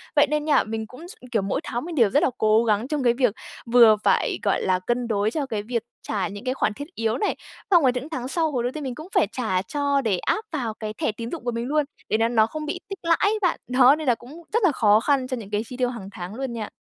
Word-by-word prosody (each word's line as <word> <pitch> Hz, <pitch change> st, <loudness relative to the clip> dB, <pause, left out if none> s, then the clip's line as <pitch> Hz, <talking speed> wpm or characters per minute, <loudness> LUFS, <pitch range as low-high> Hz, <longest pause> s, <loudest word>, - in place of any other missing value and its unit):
Vậy 290 Hz, 0 st, +5 dB
nên 300 Hz, +1 st, -1 dB
nha, 295 Hz, -3 st, +4 dB
mình 220 Hz, 0 st, -4 dB
cũng 255 Hz, +10 st, -11 dB
s -, -, -8 dB, 0.2 s
kiểu, 220 Hz, -, +2 dB
mỗi 195 Hz, +8 st, -2 dB
tháng 240 Hz, -3 st, -4 dB
mình 340 Hz, -1 st, -6 dB
đều 230 Hz, -7 st, +4 dB
rất 290 Hz, -, +2 dB
là -, -, +3 dB
cố 215 Hz, +1 st, +4 dB
gắng 220 Hz, +1 st, +1 dB
trong 295 Hz, -1 st, -2 dB
cái 240 Hz, -1 st, +4 dB
việc 245 Hz, -4 st, +2 dB, 0.3 s
vừa 235 Hz, -2 st, +7 dB
phải, -, -, +2 dB
gọi -, -, +1 dB
là, 185 Hz, -1 st, +1 dB
cân 240 Hz, 0 st, 0 dB
đối 210 Hz, -1 st, 0 dB
cho 290 Hz, +2 st, -2 dB
cái 215 Hz, -6 st, -3 dB
việc 230 Hz, +1 st, -2 dB, 0.2 s
trả 205 Hz, -3 st, -1 dB
những 205 Hz, +1 st, -8 dB
cái 255 Hz, 0 st, -1 dB
khoản 220 Hz, -5 st, 0 dB
thiết 285 Hz, +7 st, -7 dB
yếu 225 Hz, 0 st, 0 dB
này, 415 Hz, -, 0 dB, 0.4 s
xong 345 Hz, -4 st, +6 dB
rồi 260 Hz, -, +5 dB
những 260 Hz, +5 st, -4 dB
tháng 255 Hz, -6 st, -4 dB
sau 320 Hz, +2 st, 0 dB
hồi 250 Hz, -4 st, -1 dB
đầu 245 Hz, -, -1 dB
tiên 305 Hz, +2 st, -6 dB
mình 260 Hz, -3 st, -4 dB
cũng 310 Hz, +5 st, -9 dB
phải -, -, +4 dB
trả 215 Hz, -8 st, -1 dB
cho 280 Hz, +6 st, 0 dB
để 215 Hz, -7 st, +1 dB
áp 435 Hz, -, -1 dB
vào 250 Hz, -8 st, -2 dB
cái 215 Hz, -1 st, -6 dB
thẻ 220 Hz, -, -1 dB
tín 230 Hz, +2 st, -7 dB
dụng 330 Hz, -, -6 dB
của 240 Hz, -, 0 dB
mình 235 Hz, 0 st, -3 dB
luôn, 300 Hz, +1 st, +1 dB, 0.2 s
để -, -, +2 dB
nó 225 Hz, +1 st, +2 dB
nó 225 Hz, -2 st, +3 dB
không 305 Hz, +5 st, -6 dB
bị 310 Hz, +4 st, -3 dB
tích 390 Hz, -2 st, -6 dB
lãi 335 Hz, 0 st, +3 dB
ấy 430 Hz, +2 st, +2 dB
bạn, 360 Hz, -3 st, +1 dB
đó, 255 Hz, +2 st, +6 dB
nên 310 Hz, -2 st, -6 dB
là 245 Hz, -, +4 dB
cũng 285 Hz, +9 st, -13 dB
rất 460 Hz, 0 st, +2 dB
là 370 Hz, -, +5 dB
khó 215 Hz, -5 st, +4 dB
khăn 265 Hz, +1 st, +1 dB
cho 255 Hz, -1 st, -3 dB
những 215 Hz, -4 st, -8 dB
cái 210 Hz, 0 st, 0 dB
chi 250 Hz, -, -8 dB
tiêu 250 Hz, -1 st, +1 dB
hằng 225 Hz, -6 st, -7 dB
tháng 180 Hz, +2 st, -7 dB
luôn 265 Hz, -1 st, -4 dB
nha. 220 Hz, -3 st, -5 dB
245 Hz, 295 wpm, -24 LUFS, 220-290 Hz, 0.4 s, vừa